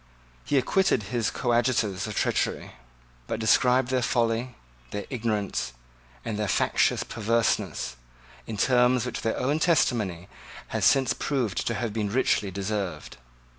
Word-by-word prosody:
He 145 - +1
acquitted 185 - +2
his 115 -2 +1
coadjutors 115 -5 0
of 105 - -5
treachery, - - -1 0.6
but - - -3
described 125 +3 +3
their 130 -1 +1
folly, 120 0 0 0.3
their 100 - -5
ignorance, 110 - -2 0.5
and 110 -2 -3
their 105 - 0
factious - - +2
perverseness, 115 - -1 0.5
in 110 - -5
terms 125 +1 +3
which 125 - -4
their 115 - -1
own 145 +5 0
testimony 105 - +1 0.4
has - - 0
since 135 -3 +4
proved 125 - -2
to 115 - 0
have 110 0 -3
been 105 -2 -1
richly 105 -3 +1
deserved. 95 - -4
115 Hz, 135 wpm, -26 LUFS, 105-125 Hz, 0.6 s, since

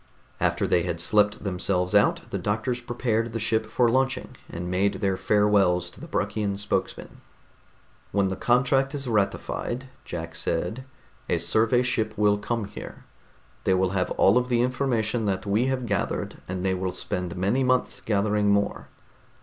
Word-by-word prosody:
After - - +1
they 85 - +3
had 85 -1 -3
slept 105 +3 +2
themselves 90 -1 0
out, 100 0 +4
the - - -2
doctors 115 +4 -1
prepared 120 -2 -1
the 115 - -2
ship 110 0 +1
for 120 +2 +2
launching, 130 +2 0
and 85 +1 -5
made 95 +2 +1
their 95 -2 0
farewells 95 -4 +2
to - - -15
the 165 - -8
Bruckian 100 -5 -1
spokesman. 100 - -3 0.9
"When 100 -1 +2
the 95 - -2
contract 135 +5 +2
is 135 -2 -4
ratified," 115 +4 -1
Jack 85 -1 -6
said, 130 +8 -2 0.4
"a - - +2
survey 115 +3 +2
ship 110 -4 0
will 105 -1 +3
come 115 0 -2
here. 100 - -10 0.6
They 95 - +3
will 95 0 +1
have 95 -2 0
all 100 +6 +5
of 125 0 -4
the 120 -1 +3
information 120 -3 0
that 95 +1 -1
we 105 +5 +1
have 130 -2 -1
gathered, - - -2
and 95 +1 -3
they 95 - +2
will 95 0 -2
spend 90 -1 -4
many 100 +9 +1
months 130 0 +1
gathering 105 0 +1
more. 100 0 0
105 Hz, 165 wpm, -25 LUFS, 95-120 Hz, 0.9 s, all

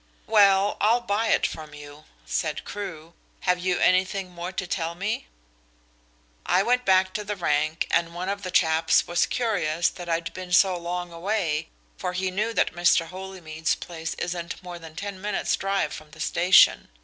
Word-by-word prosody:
"Well, 200 -2 +4
I'll 225 +4 +4
buy 220 +1 0
it - - +3
from 155 -2 -6
you," 145 +1 -12 0.2
said - - -2
Crewe. 170 -5 -7 0.3
"Have 180 -1 +1
you 180 0 0
anything 185 0 +2
more 175 +1 -6
to 185 - -3
tell 170 -1 -3
me?" 195 +5 -3 1.2
"I 185 +2 +2
went 250 +3 +1
back 185 0 +3
to 210 - -3
the 205 0 -4
rank 155 0 0
and 170 0 +1
one 180 +1 -4
of 200 +1 -2
the 185 - -5
chaps 160 -2 +3
was 175 0 +1
curious 175 -9 0
that 175 -1 -9
I'd 165 0 -1
been 185 -1 -7
so 185 +1 +5
long 175 0 -4
away, 165 -4 -1 0.3
for 180 -1 -3
he 185 +1 -1
knew 215 +5 -1
that 225 - +1
Mr. 170 -1 +3
Holymead's 180 -4 -3
place 165 -2 -6
isn't 175 +1 -5
more 175 -1 -8
than 160 -1 -12
ten 200 0 -6
minutes' 210 +1 0
drive 195 0 -1
from 155 0 -10
the - - -16
station. 180 +2 +4
180 Hz, 175 wpm, -25 LUFS, 165-195 Hz, 1.2 s, so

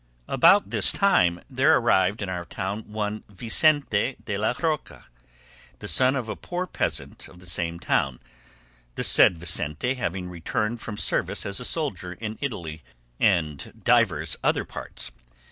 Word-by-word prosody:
About 170 +10 +4
this - - +5
time 90 - +2
there 135 +4 +3
arrived 105 -3 +2
in - - -4
our 90 -1 -4
town 100 +5 -5
one 105 0 -3
Vicente 120 - +2
de 105 - -3
la 110 +4 0
Roca, 155 -3 -3 0.7
the - - -8
son 130 +1 +3
of 125 -4 -3
a - - -4
poor 180 +1 -4
peasant - - -4
of 90 - -16
the 90 - -14
same 85 -1 -2
town, 65 -6 0 0.8
the - - -2
said 85 - +7
Vicente 85 - -1
having 95 -8 -4
returned 105 +6 -3
from 105 -3 -7
service - - 0
as 100 0 -3
a 125 - -3
soldier 100 - -2
in 110 +3 -7
Italy 85 - -5 0.4
and 75 -4 0
divers 95 -11 +2
other - - +1
parts. - - -7
105 Hz, 150 wpm, -25 LUFS, 90-125 Hz, 0.8 s, said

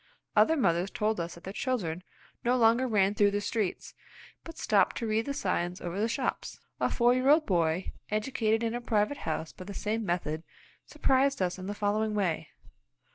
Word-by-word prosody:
Other 320 0 +5
mothers 180 - +2
told 215 0 -1
us 170 0 -4
that 170 - -14
their 195 - -6
children 195 - -2 0.4
no 245 +1 +2
longer 235 +2 +4
ran 205 -4 +3
through 205 -1 +4
the 205 0 -1
streets, 205 -1 -2 0.5
but 330 0 -10
stopped - - +2
to 235 - -2
read 220 +2 0
the 280 - -1
signs 175 -5 -1
over 175 +3 -4
the 220 - +2
shops. 255 +3 -3 0.2
A - - +2
four 240 0 +3
year 255 +2 +2
old 305 +1 +5
boy, 170 -1 0 0.2
educated 220 0 0
in 230 0 0
a 240 - -3
private 225 +3 +1
house 160 - -3
by 185 - -10
the 200 +1 -8
same 220 +2 -2
method, 170 -4 -2 0.5
surprised 275 +1 +2
us 185 0 -1
in 185 - -6
the 205 - -3
following 210 +1 0
way. 185 -6 0
210 Hz, 190 wpm, -29 LUFS, 185-240 Hz, 0.5 s, Other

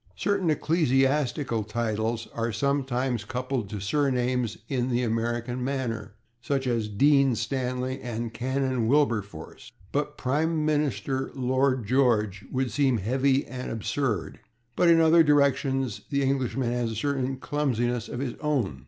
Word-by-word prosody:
Certain 200 -4 0
ecclesiastical 135 -6 +1
titles 110 +1 -2
are 115 0 -1
sometimes 130 -1 0
coupled 125 -1 -3
to 105 - -5
surnames 125 0 0
in 130 -2 -1
the 125 0 +1
American 120 +2 -1
manner, 115 -6 -3 0.3
as 135 -2 +1
in 120 -2 +1 0.2
/Dean 140 -1 +4
Stanley/, 130 +2 -2
and 115 -1 -4
/Canon 130 -1 -1
Wilberforce/, 115 - -1 0.2
but 145 +1 -2
/Prime 155 +6 0
Minister 135 -4 0
Lloyd 130 -1 +1
George/ 110 -5 +2
would 130 -1 -1
seem 135 -4 +2
heavy 130 +6 +1
and 130 0 -6
absurd. 115 - -2 0.4
But 175 - +4
in 165 -1 +6
other 165 +1 +6
directions 135 -6 +2
the 140 -1 +1
Englishman 130 -2 0
has 120 -3 -2
certain 135 +1 -1
clumsinesses 125 -4 -1
of 125 - -4
his 130 -4 -2
own. 130 - -1
130 Hz, 130 wpm, -26 LUFS, 115-140 Hz, 0.4 s, in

